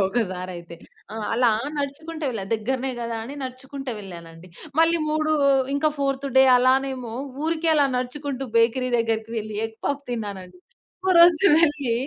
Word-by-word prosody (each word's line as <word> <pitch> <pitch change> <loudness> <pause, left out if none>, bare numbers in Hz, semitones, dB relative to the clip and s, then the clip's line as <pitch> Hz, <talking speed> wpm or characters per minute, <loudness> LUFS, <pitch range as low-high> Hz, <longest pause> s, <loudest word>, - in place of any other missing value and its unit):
ఒకసారయితే. 185 -5 -4 0.4
ఆ! - - -6 0.2
అలా 240 +1 +3 0.3
నడుచుకుంటూ 310 +3 -5
వెళ్ళా. 215 -5 -4
దగ్గరనే 260 +4 -2
కదా 230 -1 -3
అని 275 - -8
నడుచుకుంటూ 265 +1 -6
వెళ్ళానండి. 170 -3 -11 0.3
మళ్ళీ 330 +1 +4
మూడు 310 0 0 0.4
ఇంకా 310 +2 +2
ఫోర్త్ 275 0 -1
డే 265 - +8
అలానేమో 255 -1 +1 0.3
ఊరికే 325 0 0
అలా 290 -2 +4
నడుచుకుంటూ 270 +1 -4
బేకరీ 240 +3 +2
దగ్గరకి 225 -1 -1
వెళ్ళి 215 -1 -6
ఎగ్ 225 0 -15
పఫ్ 285 0 -1
తిన్నానండి. 195 -6 -6 0.5
ఒకరోజు 345 0 +6
వెళ్ళి 295 -7 +2
255 Hz, 135 wpm, -23 LUFS, 220-285 Hz, 0.5 s, డే